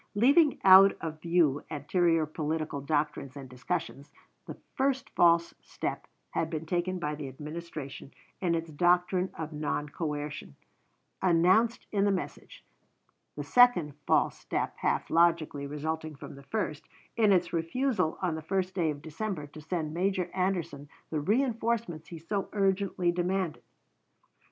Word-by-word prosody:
Leaving 280 +7 +4
out 195 +1 +9
of 160 -1 -6
view 165 -5 +2
anterior 165 +2 +1
political 155 -1 -3
doctrines 145 -2 -2
and 135 -1 -8
discussions, 135 +3 -4 0.4
the - - -7 0.2
first 265 0 0
false 170 -1 +4
step - - -5 0.2
had 160 - -1
been 160 -1 -4
taken 175 +2 -1
by 150 -4 -2
the 145 -2 -6
Administration 150 0 -8 0.3
in 175 -3 +1
its 165 -1 -4
doctrine 180 +3 +2
of 160 -1 -5
non 150 0 -2
coercion, 150 - -5 0.7
announced 190 +6 +3
in 200 -2 +1
the 205 - +3
message; 190 - -5 0.7
the - - -4
second 245 -12 +4
false - - +3
step - - -3
half - - -1
logically 165 -4 +2
resulting 155 +2 -4
from 135 - -10
the 140 - -12
first, 155 -2 -3 0.3
in 215 -3 +4
its 180 -2 +2
refusal 170 +3 0
on 175 -3 +1
the 160 - -4
first 185 +3 -1
day 170 -4 +1
of 145 0 -5
December 165 0 -4
to 150 +2 -12
send 155 -1 -3
Major 180 0 0
Anderson 170 -6 -2 0.2
the 155 - -1
reënforcements 230 - 0
he 170 - -8
so 195 +5 -3
urgently 195 -3 +1
demanded. 180 -1 -1
170 Hz, 140 wpm, -29 LUFS, 150-190 Hz, 0.7 s, out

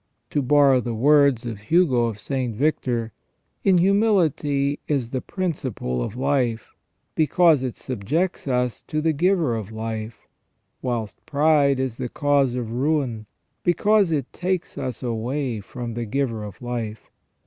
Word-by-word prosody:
To 145 - +1
borrow 140 -1 +4
the 120 -1 -3
words 140 -1 +4
of 115 -4 -5
Hugo 130 - +3
of 115 -3 -3
St. 125 0 -3
Victor: 120 -4 0 0.5
In 190 -2 +5
humility 170 -8 +2
is 130 -6 -1
the 130 - -2
principle 130 - -3
of 105 - -4
life, 130 -4 0 0.4
because 160 -1 +4
it 130 -3 -3
subjects 140 - -2
us 125 -2 0
to 155 - -1
the 160 +1 +1
Giver 170 -5 +2
of 110 -2 -5
Life; 110 0 -5 0.6
whilst 115 -5 -3
pride 145 -2 +3
is 130 -3 -2
the 125 - -4
cause 140 -3 +2
of 120 -3 -3
ruin, 125 -4 -1 0.4
because 205 +2 +3
it 145 -5 -2
takes 180 0 -2
us 130 -2 -5
away 120 +1 -2
from 115 +4 -6
the 120 +1 -3
Giver 115 -2 -2
of 105 +3 -10
Life. 115 -3 -5
130 Hz, 145 wpm, -23 LUFS, 115-150 Hz, 0.6 s, In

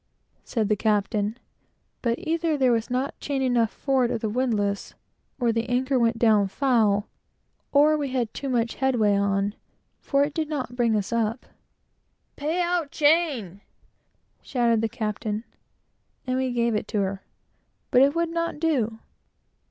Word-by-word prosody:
said 220 -4 -1
the 210 - +2
captain 210 +1 0 0.6
but 235 -1 0
either 325 -1 -1
there 260 -3 +3
was 230 -1 0
not 255 +3 -2
chain 280 -2 -2
enough 240 -3 +2
forward 265 -2 0
of - - -1
the 220 - -2
windlass, 210 -5 -1 0.4
or 240 -2 +2
the 230 +1 -2
anchor 255 +1 +1
went 230 0 +2
down 215 -3 +4
foul, 215 -3 +2 0.6
or 295 +2 +5
we 290 -2 -1
had 245 -4 -2
too 275 - -4
much 235 -2 0
headway 240 -6 +3
on, 200 0 +1 0.5
for 280 0 +1
it 290 0 -2
did 310 -1 -2
not 260 -5 -4
bring 235 -3 +2
us 210 +2 -2
up. 230 +1 -1 0.9
"Pay 310 +5 -2
out 345 -4 0
chain!" 290 - +1 0.8
shouted 235 -4 +1
the 225 - 0
captain; 215 0 -3 0.8
and 255 0 -1
we 260 -1 0
gave 235 -1 +1
it 210 - -2
to 210 - -1
her; 195 0 -2 0.7
but 250 - +6
it 280 +3 +4
would 335 0 +1
not 335 -2 -2
do. 255 -9 0
240 Hz, 155 wpm, -25 LUFS, 215-280 Hz, 0.9 s, but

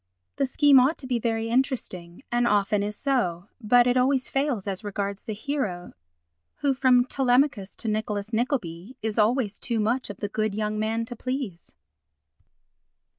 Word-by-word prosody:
The 275 - +1
scheme 280 0 +6
ought 265 +6 +3
to 270 - -7
be 250 -2 0
very 225 -1 -1
interesting, 230 -8 -2
and 240 0 +2
often 205 -1 +2
is 210 +1 -2
so, 210 - -1
but 245 +2 +5
it 245 +1 +2
always 260 +1 +2
fails 270 -7 0
as 195 +1 -4
regards 200 -1 -4
the 215 - -4
hero 210 -8 -3 0.7
who, 280 -1 +2
from 255 -2 +4
Telemachus 255 -5 +1
to 230 - -6
Nicholas 210 0 -2
Nickleby, 220 - -2
is 220 0 -1
always 215 -1 +1
too 235 -2 -1
much 235 +4 0
of 200 - -7
the 205 - -3
good 215 0 -2
young 215 0 -2
man 225 +1 -1
to 245 +1 -7
please. 255 -8 -5
230 Hz, 165 wpm, -26 LUFS, 205-255 Hz, 0.7 s, scheme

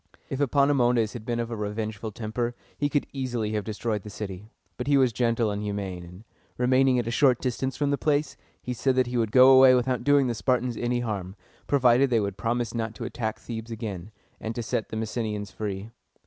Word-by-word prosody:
If 135 - -2
Epaminondas 125 -5 +3
had 115 -3 -8
been 120 -1 -1
of 120 0 -3
a - - -2
revengeful 105 0 -4
temper, 120 +3 -3 0.2
he 145 - 0
could 145 -1 0
easily 120 -5 -2
have 105 -1 -1
destroyed 110 0 -3
the 105 - -9
city; 100 0 -7 0.3
but 125 - -5
he 145 -1 +4
was 130 -3 +3
gentle 115 -2 +1
and 100 0 -3
humane, 100 -4 -4
and, 90 +4 -12 0.3
remaining 130 +1 +3
at 120 - 0
a 115 - -2
short 130 -1 +4
distance 130 +1 -2
from 145 -1 +1
the 140 - 0
place, 150 -1 0 0.3
he 125 - -3
said 130 +2 +1
that 130 0 +3
he 120 +1 -5
would 110 -3 0
go 130 +2 +8
away 130 -1 +8
without 125 0 0
doing 145 -1 +4
the 120 - 0
Spartans 125 +1 0
any 120 0 -1
harm, 100 -5 -4 0.3
provided 130 -1 +4
they 120 -2 +3
would 100 -2 -2
promise 115 +1 -1
not 115 -2 -3
to 115 - -6
attack 115 -1 -3
Thebes 115 -1 -7
again, 105 -5 -5 0.3
and 110 +1 -5
to 120 - -3
set 110 - -2
the 110 - -4
Messenians 110 -2 -3
free. 100 +2 -5
115 Hz, 215 wpm, -26 LUFS, 110-130 Hz, 0.3 s, go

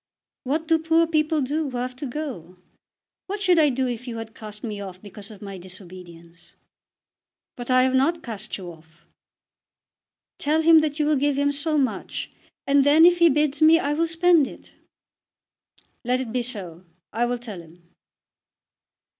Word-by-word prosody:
"What 310 +5 -1
do 325 0 +3
poor 325 +1 +3
people 310 -1 +1
do 295 +3 -1
who 250 - -5
have 250 +1 -4
to 280 - -5
go? 240 - -6 0.7
What 405 +2 -4
should 365 -4 +3
I 300 -2 +5
do 260 0 -1
if 245 +1 -5
you 230 -2 -5
had 225 0 -8
cast 210 -2 -11
me 210 -3 -5
off 185 -2 -8
because 205 0 -10
of 210 -2 -12
my 195 -2 -7
disobedience?" 175 -2 -13 1.0
"But 245 0 -8
I 255 0 +5
have 260 0 +1
not 320 +6 +1
cast 215 -3 -6
you 180 -3 -8
off." 160 0 -20 1.3
"Tell 310 +2 +1
him 325 0 +7
that 305 -1 -1
you 300 - +1
will 300 -1 +2
give 285 0 +1
him 285 0 +2
so 300 +2 0
much, 270 -3 -2 0.3
and 280 0 +4
then, 300 +4 +6
if 350 0 +5
he 340 -1 +6
bids 295 0 0
me, 320 +1 +7
I 290 -3 -1
will 330 +2 0
spend 330 -3 +3
it." - - -14 1.3
"Let 250 +1 0
it 255 -4 -5
be 250 - 0
so. 190 -8 -7 0.3
I 235 +2 +1
will 245 0 -1
tell 220 -7 -8
him." 170 +1 -19
260 Hz, 180 wpm, -24 LUFS, 210-310 Hz, 1.3 s, him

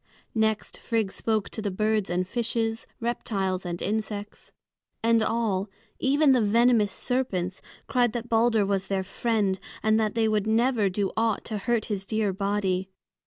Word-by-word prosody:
Next 220 -1 0
Frigg 225 -5 -1
spoke 215 -1 -1
to 220 - -5
the 205 - -1
birds 215 +1 0
and 180 +1 0
fishes, 225 0 -1
reptiles 195 -6 -2
and 175 0 -3
insects. 210 -1 -4 0.5
And 230 0 +4
all 220 -3 0 0.3
even 280 +2 +4
the 255 -2 +4
venomous 225 0 +4
serpents 190 -9 -1 0.2
cried 245 -3 +2
that 240 -1 -4
Balder 225 -2 +3
was 195 -1 -1
their 195 -1 0
friend, 205 -2 0 0.2
and 220 0 +3
that 215 -1 0
they 225 -1 +3
would 215 -1 +1
never 225 -2 +3
do 195 +1 -1
aught 225 -1 0
to 215 -2 -3
hurt 230 +1 0
his 195 -3 -4
dear 215 -2 0
body. 195 -1 -1
215 Hz, 160 wpm, -26 LUFS, 195-230 Hz, 0.5 s, And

